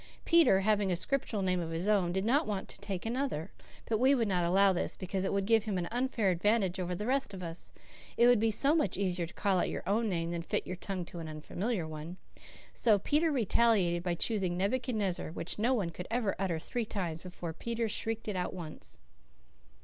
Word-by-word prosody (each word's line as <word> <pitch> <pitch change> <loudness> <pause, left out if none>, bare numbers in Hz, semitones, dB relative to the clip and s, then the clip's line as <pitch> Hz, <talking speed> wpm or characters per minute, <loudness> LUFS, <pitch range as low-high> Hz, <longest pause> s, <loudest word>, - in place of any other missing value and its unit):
Peter 330 - +5
having 205 -1 +2
a - - +2
Scriptural 225 0 -1
name 185 -1 +1
of 165 -2 -3
his 165 +4 -3
own, 195 -5 +3
did 190 +2 -1
not 280 +7 +2
want 200 -2 -3
to - - -11
take 195 -2 -4
another; 235 - -2 0.4
but 220 -2 +1
we 265 +3 +5
would 230 -4 +1
not 180 -3 +1
allow 190 +3 +4
this, 175 - -2
because 185 0 -3
it 190 - 0
would 200 -1 0
give 225 0 +3
him 205 -4 -1
an 175 -1 -2
unfair 240 -5 +1
advantage 190 +1 +1
over 180 0 -2
the 210 - -4
rest 265 -4 0
of 185 - -7
us. 165 0 -6 0.5
It 235 - +6
would 245 -2 +6
be 225 +1 +2
so 275 +7 +2
much 305 - +1
easier 180 -3 -1
to 175 - -14
call 195 -3 +1
out - - +1
your - - -5
own 220 +3 +1
name 170 -2 -1
than 170 -1 -2
fit - - -1
your 185 - -4
tongue 185 -1 -4
to 170 - -9
an 165 - -6
unfamiliar 175 +5 -3
one. 155 +3 -7 0.6
So 220 -4 +4
Peter 305 - +2
retaliated 220 -8 +3
by 175 -1 -1
choosing 185 -2 0
Nebuchadnezzar, 205 -5 -1
which 175 +3 -5
no 245 +4 +3
one 190 -7 -1
could 180 +2 -7
ever 225 -3 0
utter 185 -4 0
three 230 +8 -3
times 175 -7 -3
before 175 -2 -6
Peter 230 +6 -2
shrieked 225 +1 -2
it 210 - -2
out 180 0 -2
once. 165 -4 -8
195 Hz, 220 wpm, -31 LUFS, 175-225 Hz, 0.6 s, It